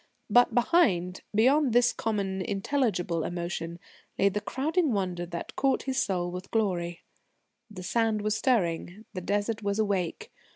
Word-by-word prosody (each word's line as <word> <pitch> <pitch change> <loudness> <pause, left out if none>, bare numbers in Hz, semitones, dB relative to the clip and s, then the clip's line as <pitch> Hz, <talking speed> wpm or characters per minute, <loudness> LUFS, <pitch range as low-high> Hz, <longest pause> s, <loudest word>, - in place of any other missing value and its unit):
But 245 +3 +5
behind, 215 - +2
beyond 260 +4 +4
this 245 0 +4
common, 200 -4 -2
intelligible 195 - 0
emotion, 170 -1 -4 0.4
lay 200 - +4
the 210 +2 -3
crowding 300 - 0
wonder 180 -3 -2
that 170 0 -6
caught 270 -1 +1
his 265 -1 0
soul 175 -2 -1
with 180 +1 -7
glory: 175 -6 -1 0.7
The 190 -4 -9
Sand 220 +2 +1
was 215 0 +1
stirring, 205 -4 0
the 185 - -4
Desert 205 +4 -1
was 200 0 -1
awake. 205 - -1
205 Hz, 140 wpm, -28 LUFS, 180-240 Hz, 0.7 s, But